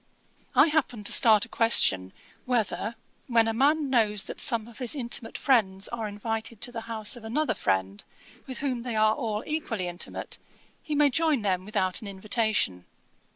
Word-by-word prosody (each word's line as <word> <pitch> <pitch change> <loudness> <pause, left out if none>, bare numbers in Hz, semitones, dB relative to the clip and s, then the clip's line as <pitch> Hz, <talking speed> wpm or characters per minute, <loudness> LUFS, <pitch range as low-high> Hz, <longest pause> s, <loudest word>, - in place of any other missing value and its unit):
I - - +7
happened 255 -8 -1
to - - +3
start 220 -3 +5
a - - -16
question, 95 - +3 0.3
whether, 235 -2 -1 0.3
when 230 -3 +3
a 225 - 0
man 285 +3 +2
knows 210 -5 +2
that - - -6
some 230 -2 0
of 235 - -13
his 250 +2 -1
intimate 240 -3 -1
friends 200 -8 +1
are 225 -2 -4
invited 220 +2 -4
to 245 - -1
the 230 -2 -5
house 220 -1 -1
of 240 - -12
another 240 +3 0
friend, 95 - -1 0.4
with 260 -2 -6
whom 250 -3 -1
they 240 -1 -4
are 215 0 +4
all 220 -1 -3
equally 235 - -3
intimate, 175 +1 -6 0.4
he 300 - -4
may 290 -1 +4
join 310 -4 +1
them 185 -2 0
without 195 -3 -1
an 215 - -8
invitation. 205 - -1
225 Hz, 175 wpm, -27 LUFS, 205-245 Hz, 0.4 s, I